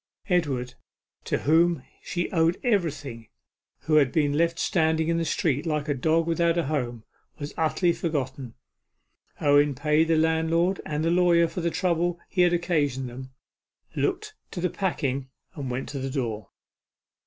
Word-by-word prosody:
Edward, 135 -9 0 0.5
to - - 0
whom 165 +3 +3 0.2
she 175 -1 -2
owed 165 0 +2
everything, 150 - -1 0.5
who 155 +3 +2
had 140 -4 +4
been 145 -3 +1
left 165 +2 +1
standing 160 -2 +1
in 165 0 +1
the - - 0
street 150 -2 0
like 150 -3 -2
a 145 - +1
dog 160 +5 +1
without 170 0 +1
a 170 - +2
home, 125 -6 -2 0.3
was 145 0 -6
utterly 170 +2 +1
forgotten. 140 -7 -3 0.8
Owen 145 -1 +4
paid 150 +4 +2
the 165 - +3
landlord 160 +3 +1
and 150 +1 -2
the 165 - +2
lawyer 175 -1 +4
for 175 - -5
the 170 - +1
trouble 175 -1 0
he 180 - +1
had 175 -1 +5
occasioned 150 -7 0
them, 130 +2 -9 0.6
looked 430 0 -1 0.2
to - - -6
the 180 -1 0
packing, 140 -8 -2 0.2
and 140 -7 -5
went 125 +2 -3
to 140 - -5
the 135 0 -3
door. 115 -7 -3
160 Hz, 160 wpm, -26 LUFS, 140-170 Hz, 0.8 s, had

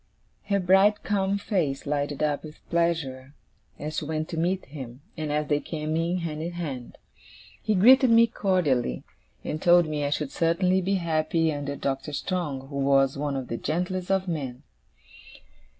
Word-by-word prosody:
Her 200 -1 +1
bright 195 +3 +4
calm 200 -1 0
face 175 -10 -1
lighted 145 0 -1
up 150 -1 0
with 155 -1 -12
pleasure 150 -6 -1 0.4
as 155 +1 -5
she - - -2
went 155 +1 -3
to 170 - -4
meet 180 +3 0
him, 130 -3 -9
and 155 -2 -3
as 150 +1 0
they 145 -1 +2
came 155 0 -4
in, 170 +2 0
hand 160 -3 -4
in 170 +2 -4
hand. 140 -8 -6 0.6
He 215 - +1
greeted 255 +7 +7
me 230 0 +7
cordially; 175 - 0 0.4
and 155 - -4
told 175 0 +6
me 150 -1 -2
I 145 - 0
should 145 -1 -2
certainly 180 +3 +2
be 195 +2 0
happy 165 -2 +1
under 140 -1 -4
Doctor 140 +2 -3
Strong, 145 -5 -3
who 140 - -5
was 135 -1 +3
one 145 0 -2
of 130 -2 -4
the 115 - -3
gentlest 180 +5 -2
of 190 -1 +1
men. 140 -6 -4
155 Hz, 170 wpm, -26 LUFS, 140-180 Hz, 0.6 s, greeted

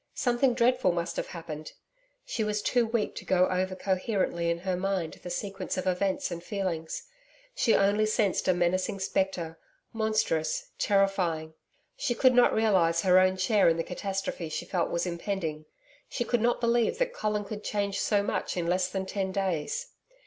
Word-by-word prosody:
Something 245 0 +2
dreadful 250 -4 +3
must 170 0 -2
have - - -2
happened. 160 -3 -7 0.5
She 225 - -2
was 210 -1 -1
too 240 -2 +2
weak 225 -2 -1
to - - -6
go 185 -1 +3
over 185 0 -1
coherently 185 -3 0
in 170 - +1
her 185 0 -1
mind 185 -3 -1
the 180 - -7
sequence 195 +2 -4
of 185 - -2
events 185 +1 0
and 170 0 -5
feelings. 180 - -3 0.5
She 235 - +3
only 205 +2 +3
sensed 215 -3 +1
a 185 - +5
menacing 180 +2 0
spectre, 185 -4 -1 0.3
monstrous, 215 -8 0
terrifying. 185 -6 +1 0.4
She 285 - -1
could 255 +1 +5
not 245 0 +5
realise 185 -7 +3
her 185 -1 +6
own 185 0 +3
share 195 0 +4
in 165 - +1
the 165 - 0
catastrophe 190 -2 -4
she 155 - -4
felt 175 -3 -1
was 170 +1 -1
impending. 170 -3 -3 0.4
She 240 - -2
could 240 -1 0
not 240 +1 +2
believe 235 - +2
that - - 0
Colin 210 - -1
could 210 +1 -7
change 200 -2 -1
so 205 -2 +2
much 200 - -2
in 175 - -1
less 180 +1 +1
than 190 -1 -3
ten 190 0 -2
days. 195 - -2
190 Hz, 175 wpm, -28 LUFS, 175-215 Hz, 0.5 s, her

